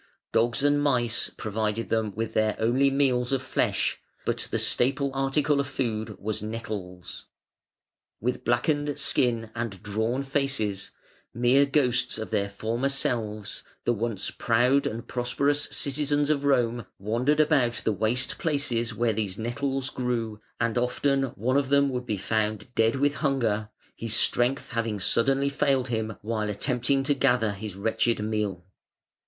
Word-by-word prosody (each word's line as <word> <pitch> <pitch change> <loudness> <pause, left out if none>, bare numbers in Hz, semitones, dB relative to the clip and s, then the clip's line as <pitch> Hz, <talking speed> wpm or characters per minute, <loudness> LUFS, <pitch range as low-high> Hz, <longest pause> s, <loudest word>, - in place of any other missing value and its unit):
Dogs 120 +4 +2
and 145 0 +3
mice 125 -5 +1
provided 110 0 -2
them 110 -3 0
with 110 0 -3
their 110 -1 +2
only 125 +5 +3
meals 130 -3 +1
of 135 -1 0
flesh, 135 - 0 0.3
but - - -1
the - - 0
staple 135 +2 +1
article 140 +2 +1
of 140 - 0
food 110 -6 -3
was 110 +1 -3
nettles. 105 -5 -6 0.9
With 125 +3 -2
blackened 145 +4 +1
skin 115 -3 +1
and 115 -6 -4
drawn 110 +6 -1
faces, 135 -8 -1 0.5
mere 125 +4 +4
ghosts 135 -6 +2
of 110 0 -5
their 100 -2 0
former 115 +6 -1
selves, 110 -6 -2 0.2
the 120 - +3
once 110 -2 -2
proud 125 +4 +2
and 115 +1 -5
prosperous 130 +4 +1
citizens 145 +1 0
of 140 -2 0
Rome 120 -4 +2
wandered 120 +9 +1
about 140 -6 +3
the 110 - +1
waste 110 +5 0
places 120 -7 0
where 115 0 +1
these 100 -3 -2
nettles 130 +3 -2
grew, 115 -4 -2 0.2
and 115 0 +1
often 135 +2 +1
one 130 +6 +1
of 140 -2 +1
them 140 0 +4
would 125 -1 -4
be 105 - -1
found 110 +3 -1
dead 115 +1 +3
with 140 +1 +2
hunger, 120 -8 0 0.3
his 115 -1 -3
strength 125 +3 +2
having 115 -3 -1
suddenly 135 +8 +2
failed 135 -3 +1
him 110 -2 -2
while 110 -1 -1
attempting 125 +5 0
to 145 +1 +2
gather 125 -5 +2
his 100 -1 -6
wretched 115 +3 0
meal. 105 -4 -2
120 Hz, 150 wpm, -27 LUFS, 110-135 Hz, 0.9 s, mere